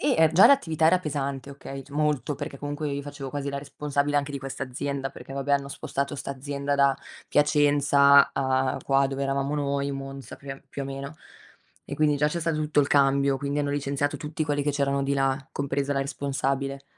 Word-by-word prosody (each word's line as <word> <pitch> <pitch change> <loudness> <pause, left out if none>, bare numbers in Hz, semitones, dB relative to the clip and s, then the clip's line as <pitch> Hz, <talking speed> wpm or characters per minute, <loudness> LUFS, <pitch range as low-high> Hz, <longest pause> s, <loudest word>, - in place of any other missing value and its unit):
Eh 160 - +4
già 180 +4 +8
l'attività 160 - +3
era 180 +3 +5
pesante 140 -4 -4
okay, 135 0 -8
c 145 - -20
molto 150 -2 0
perché 140 - -6
comunque 145 +2 -4
io 140 0 -3
facevo 145 -1 -7
quasi 140 0 -3
la 140 - -3
responsabile 145 0 -1
anche 145 0 0
di 140 - -3
questa 135 0 -6
azienda 135 +1 -3
perché 135 - -10
vabbè, 140 +1 -1
hanno 140 0 +1
spostato 140 +1 -3
sta 140 - -5
azienda 140 +1 -3
da 140 -1 +3 0.3
Piacenza 145 -1 +5
a 130 -1 0
qua, 135 0 +3
dove 135 0 -4
eravamo 140 +1 -1
noi, 140 -1 -1
Monza 135 0 -7
più 140 0 -10
a 135 - -12
più 140 - -7
o - - -4
meno. 140 +2 -6 0.7
E - - -6
quindi 150 -1 +2
già 150 +1 +2
c'è 170 - -3
stato 165 -1 0
tutto 150 -1 +2
il 140 - +1
cambio, 140 -1 +3
quindi 140 +1 -2
hanno 145 -1 0
licenziato 140 0 -1
tutti 155 +1 -4
quelli 145 -1 0
che 145 - +1
c'erano 140 -1 0
di 140 +1 0
là, 135 0 0
compresa 140 0 -1
la 135 - 0
responsabile. 140 0 -2
140 Hz, 205 wpm, -26 LUFS, 135-145 Hz, 0.7 s, già